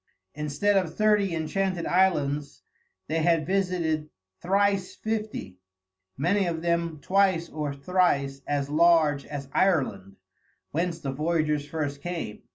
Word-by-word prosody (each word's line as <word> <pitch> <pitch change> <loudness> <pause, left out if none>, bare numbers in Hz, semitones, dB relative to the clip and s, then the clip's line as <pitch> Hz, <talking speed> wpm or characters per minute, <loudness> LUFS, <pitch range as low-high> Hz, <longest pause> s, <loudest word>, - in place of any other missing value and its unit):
Instead 150 +8 +1
of 180 -4 -1
thirty 210 -3 +3
enchanted 175 +2 -1
islands 150 -6 +1 0.4
they 160 +1 0
had 165 -1 +2
visited 180 -5 0 0.3
thrice 195 0 +1
fifty, 215 - -4 0.6
many 180 +7 +1
of 165 -1 -3
them 170 -2 0
twice 185 -3 +2
or 150 -2 -3
thrice 140 -3 0
as 145 -1 0
large 155 -2 +3
as 140 -2 -6
Ireland, 125 - +1 0.6
whence 170 +1 -1
the 135 -4 -3
voyagers 150 0 0
first 145 -2 -3
came. 170 -10 -5
165 Hz, 120 wpm, -26 LUFS, 145-185 Hz, 0.6 s, thirty